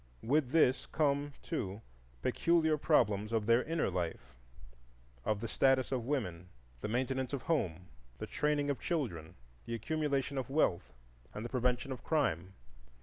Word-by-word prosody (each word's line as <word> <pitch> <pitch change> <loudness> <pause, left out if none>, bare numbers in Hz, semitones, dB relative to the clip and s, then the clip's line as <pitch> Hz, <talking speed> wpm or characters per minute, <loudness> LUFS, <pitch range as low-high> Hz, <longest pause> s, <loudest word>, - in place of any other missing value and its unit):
With 140 +2 +2
this 135 -3 +3
come, 145 -1 +1
too, 110 - -3 0.4
peculiar 165 -2 +3
problems 110 -9 +2
of 110 -2 +1
their 115 +2 +5
inner 165 +3 0
life,—of - - -6
the 115 - -2
status 135 +1 +3
of 125 -3 -1
women, 90 - -2 0.3
the - - -2
maintenance 130 +3 -1
of 135 -3 -2
Home, 90 - 0 0.3
the 110 - -4
training 145 +5 0
of 140 - -3
children, 110 - -3 0.3
the 115 - -2
accumulation 140 +1 -1
of 130 - -5
wealth, 135 - +1 0.4
and 105 - -4
the - - -4
prevention 125 +1 0
of 130 - -6
crime. 95 - 0
125 Hz, 145 wpm, -33 LUFS, 95-145 Hz, 0.4 s, their